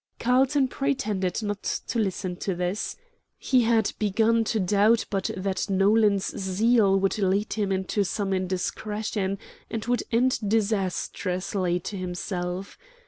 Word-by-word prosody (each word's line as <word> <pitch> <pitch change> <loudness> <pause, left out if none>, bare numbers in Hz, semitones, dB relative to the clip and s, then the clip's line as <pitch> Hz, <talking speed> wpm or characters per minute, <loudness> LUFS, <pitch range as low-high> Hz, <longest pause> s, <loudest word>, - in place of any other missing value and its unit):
Carlton 260 +3 +3
pretended 220 -9 -1
not 205 -1 -3
to 235 - -2
listen 190 -3 -1
to 190 +1 -3
this. 180 +4 -2 0.4
He 255 -2 +2
had 225 -2 +2
begun 220 +2 +2
to 220 - 0
doubt 210 +4 +3
but 195 -2 -1
that 190 +1 -2
Nolan's 200 +1 +3
zeal 195 +1 +3
would 195 +2 0
lead 200 +2 +1
him 205 -3 -1
into 190 +2 0
some 195 +1 -2
indiscretion, 195 +2 -2 0.3
and 225 -1 -4
would 245 +1 +1
end 250 +2 +2
disastrously 190 -3 0
to 200 +3 -5
himself. 180 +1 -4
200 Hz, 130 wpm, -26 LUFS, 190-225 Hz, 0.4 s, Carlton